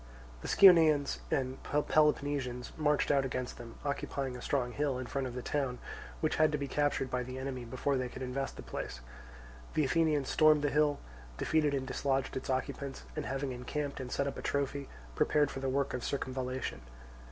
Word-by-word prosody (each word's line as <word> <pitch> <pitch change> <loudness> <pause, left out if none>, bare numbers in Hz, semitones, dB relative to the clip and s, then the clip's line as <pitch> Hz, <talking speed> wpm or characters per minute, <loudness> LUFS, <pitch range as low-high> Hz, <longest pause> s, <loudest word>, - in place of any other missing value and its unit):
The - - -6
Scionaeans 160 -7 +6
and 130 -1 -1
Peloponnesians 145 -4 +1
marched 150 -2 +2
out 140 -1 +4
against 125 -1 -3
them, 115 -1 -9
occupying 140 -2 -2
a 125 - -7
strong 125 -3 0
hill 140 -1 0
in 130 - -4
front 135 +1 -2
of 125 - -7
the 125 - -4
town, 135 -4 -1 0.4
which 155 - +1
had 155 -1 +4
to - - +2
be 140 -1 -3
captured 145 -2 0
by 125 - 0
the 130 +1 -6
enemy 130 -2 -4
before 130 +3 0
they 130 -1 -2
could 130 - -7
invest 135 +2 -3
the - - -8
place. - - -5 0.7
The 155 - +3
Athenians 150 -1 +2
stormed 155 -2 +5
the 145 - +2
hill, 150 -1 +3 0.4
defeated 150 -2 +2
and 135 -1 -2
dislodged 135 0 -1
its 130 - -4
occupants, 135 +1 -2
and, 155 -2 -3
having 135 0 -2
encamped 140 +4 -4
and 125 -2 -5
set 140 - 0
up 140 - -3
a - - -5
trophy, 140 0 -1 0.2
prepared 145 - +2
for - - -5
the 135 0 -1
work 140 +1 0
of 125 - -3
circumvallation. 130 - -3
135 Hz, 190 wpm, -32 LUFS, 130-145 Hz, 0.7 s, Scionaeans